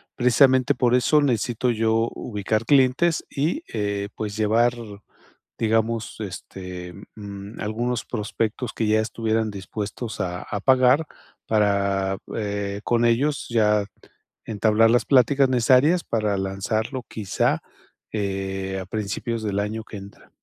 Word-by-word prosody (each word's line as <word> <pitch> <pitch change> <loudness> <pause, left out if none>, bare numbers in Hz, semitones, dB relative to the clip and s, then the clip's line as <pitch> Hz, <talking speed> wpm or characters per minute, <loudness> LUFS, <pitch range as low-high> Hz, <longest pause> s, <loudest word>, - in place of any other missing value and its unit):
Precisamente 130 +1 +4
por 125 -1 +2
eso 150 +4 +4
necesito 120 -2 +1
yo 115 0 +1
ubicar 110 0 -2
clientes 140 +5 +3
y, 160 - -1
eh, 100 -1 -2
pues, 105 0 -4
llevar, 115 +3 +3 0.9
digamos, 115 0 0
este, 90 -3 -7 0.2
mm, 100 0 -9
algunos 120 +3 -2
prospectos 115 +1 -3
que 110 - -1
ya 110 +1 +3
estuvieran 110 -1 -1
dispuestos 105 +3 -6
a 90 -1 -3
a 100 - -4
pagar 130 +5 +4 0.4
para, 100 -2 +1 0.2
eh, 100 -1 -3
con 120 0 +2
ellos 140 +5 +1
ya 105 -3 +3 0.6
entablar 110 +1 +3
las 120 - +3
pláticas 135 +1 +4
necesarias 130 +8 +4
para 105 -3 0
lanzarlo, 110 +6 -2
quizá, 105 -4 -1 0.5
eh, 95 -2 -3
a - - -7
principios 110 +3 -3
del 100 -2 -2
año 105 +2 -3
que 110 - -9
entra. 100 +1 -13
110 Hz, 125 wpm, -23 LUFS, 100-120 Hz, 0.9 s, Precisamente